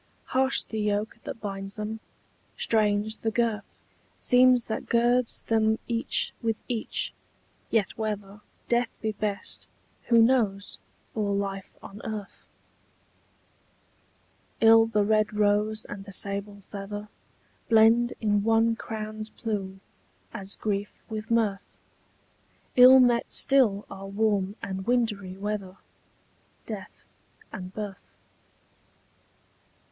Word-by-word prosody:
Harsh 265 +1 +3
the 220 - -5
yoke 210 +2 -1
that - - -6
binds 195 -1 -5
them, 215 +1 -4 0.6
strange 215 0 +2
the 225 - -1
girth 225 -2 -2 0.3
Seems 250 -1 +4
that 220 - -4
girds 240 +1 +2
them 220 -1 +2
each 235 0 0
with 225 -2 0
each: 235 -3 -2 0.6
yet 210 -4 +1
whether 210 -2 -4 0.3
Death 240 0 0
be 220 - -1
best, 205 -1 -4 0.4
who 235 -1 +5
knows, 225 -5 +2 0.3
or 205 -2 0
life 195 -1 -4
on 200 +2 -10
earth? 215 -3 -7 2.1
Ill 225 0 +7
the 210 -2 +1
rose 215 0 +1
red - - -6
and 195 -1 -11
the 200 - -10
sable 200 +1 -1
feather 205 +1 -6 0.6
Blend 230 +2 +5
in 205 -2 +2
one 225 +1 +3
crown's 215 -1 -6
plume, 195 -4 -4 0.5
as 200 -3 -6
grief 205 -1 -3
with 215 0 -5
mirth: 215 -4 0 1.0
Ill 255 +1 +9
met 240 -2 +3
still 230 -7 +3
are 195 0 -8
warm 200 -1 0
and 190 +1 -5
wintry 210 -6 0
weather, 200 -2 -4 0.9
Death 205 -3 -8 0.5
and 185 0 -7
birth. 205 -3 -7
215 Hz, 110 wpm, -27 LUFS, 200-225 Hz, 2.1 s, Ill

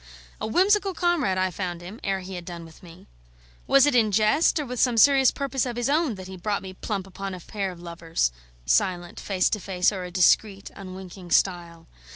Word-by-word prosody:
A - - -2
whimsical 390 - +2
comrade 330 - +1
I 185 0 +1
found 175 -1 -4
him, 185 +6 -10
ere 195 -1 -1
he 190 +1 -8
had 175 -1 -6
done 170 -1 -8
with 160 -1 -16
me. 170 -2 -14 0.6
Was 275 0 +6
it 290 - +2
in 225 -4 +3
jest, 215 - +3
or 300 - -2
with 250 -1 -5
some 245 -3 +2
serious 270 +2 +6
purpose 275 -2 -2
of 240 - -4
his 240 +2 -1
own, 300 -6 +1
that 185 -1 -9
he 190 0 -9
brought 200 +3 -2
me 190 -1 -8
plump 195 0 -4
upon 195 0 -6
a - - -9
pair 195 +2 -4
of 175 - -12
lovers, 170 - -2 0.3
silent, 175 - 0
face 185 -3 0
to 210 - 0
face 180 -1 +1
o'er 190 -3 -5
a - - -7
discreet 195 +3 +2
unwinking 185 -1 -10
stile? 170 -2 0
195 Hz, 210 wpm, -25 LUFS, 180-240 Hz, 0.6 s, Was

